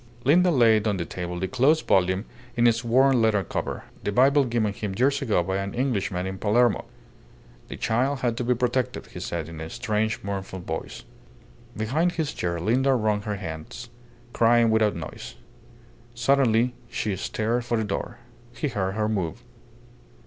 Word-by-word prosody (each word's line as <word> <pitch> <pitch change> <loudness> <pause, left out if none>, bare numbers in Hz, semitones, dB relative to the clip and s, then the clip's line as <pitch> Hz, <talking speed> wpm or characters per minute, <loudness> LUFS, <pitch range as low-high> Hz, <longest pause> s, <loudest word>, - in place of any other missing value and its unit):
Linda 175 +7 +5
laid 115 -7 +4
on 100 -2 +1
the 85 - -3
table 90 0 -5
the 95 - -1
closed 135 +7 +2
volume 95 +2 +2 0.3
in 120 - +4
its 115 0 +3
worn 130 +2 +4
leather 110 -3 +2
cover, - - -4 0.2
the 105 - -1
Bible 135 +5 +4
given 115 -4 0
him 100 -1 -4
ages 135 +7 +1
ago 110 -9 +1
by 95 +2 -2
an 100 +3 -4
Englishman 100 -8 -1
in 95 0 -5
Palermo. 115 +2 +2 0.8
"The - - -7
child 130 +4 0
had 120 -2 0
to 125 - -1
be 125 +1 +2
protected," 125 +1 -1
he - - -6
said, 85 -3 -4
in 80 -1 -8
a 80 - -6
strange, 110 +3 -1
mournful 95 -1 -4
voice. 80 -7 -6 0.7
Behind 150 +12 0
his 155 -3 -2
chair 85 -1 -2
Linda 130 +9 +2
wrung 105 -3 +1
her 105 0 -3
hands, 85 +6 -7 0.4
crying 115 0 +4
without 110 -2 +2
noise. 85 - -8 0.8
Suddenly 120 -1 +3 0.2
she 105 -3 -2
started 110 +5 -1
for 120 -1 0
the 110 - 0
door. 105 -2 -4 0.4
He 150 - -2
heard 95 -5 -2
her 105 0 0
move. 95 -8 -2
110 Hz, 170 wpm, -25 LUFS, 95-125 Hz, 0.8 s, Linda